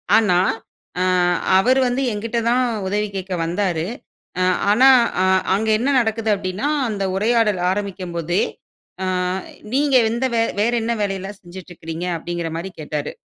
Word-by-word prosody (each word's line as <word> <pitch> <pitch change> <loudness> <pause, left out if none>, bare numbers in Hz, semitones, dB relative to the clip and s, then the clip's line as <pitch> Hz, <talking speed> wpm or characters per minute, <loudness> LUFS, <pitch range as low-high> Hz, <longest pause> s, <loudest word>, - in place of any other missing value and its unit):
ஆனா, 205 -6 +4 0.6
அ - - +3 0.5
அவரு 255 +7 +4
வந்து 245 +2 -1
எங்கிட்ட 225 +3 -3
தான் 250 +1 +3 0.2
உதவி 210 +2 0
கேட்க 190 0 -4
வந்தாரு. 175 -2 -1 0.6
அ - - +3 0.3
ஆனா, 260 +5 +6 0.3
அ - - +3 0.3
அங்க 220 +2 -1
என்ன 265 +4 0
நடக்குது 225 -1 0
அப்பிடினா, 190 +8 -3 0.2
அந்த 200 -2 -3
உரையாடல் 215 -2 +2
ஆரம்பிக்கும் 190 -3 -4
போதே, 175 +3 0 0.6
ஆ - - -1 0.7
நீங்க 280 -1 +2 0.2
எந்த, 240 +3 -1
வே 225 - +3 0.2
வேற 235 +3 +2
என்ன 235 +1 0
வேலை 195 -1 -1
எல்லாம் 195 +1 -8
செஞ்சிட்டுருக்குறீங்க? 175 -2 -8
அப்பிடிங்கிறமாரி 170 +2 -4
கேட்டாரு. 150 -1 -4
200 Hz, 140 wpm, -20 LUFS, 180-230 Hz, 0.7 s, ஆனா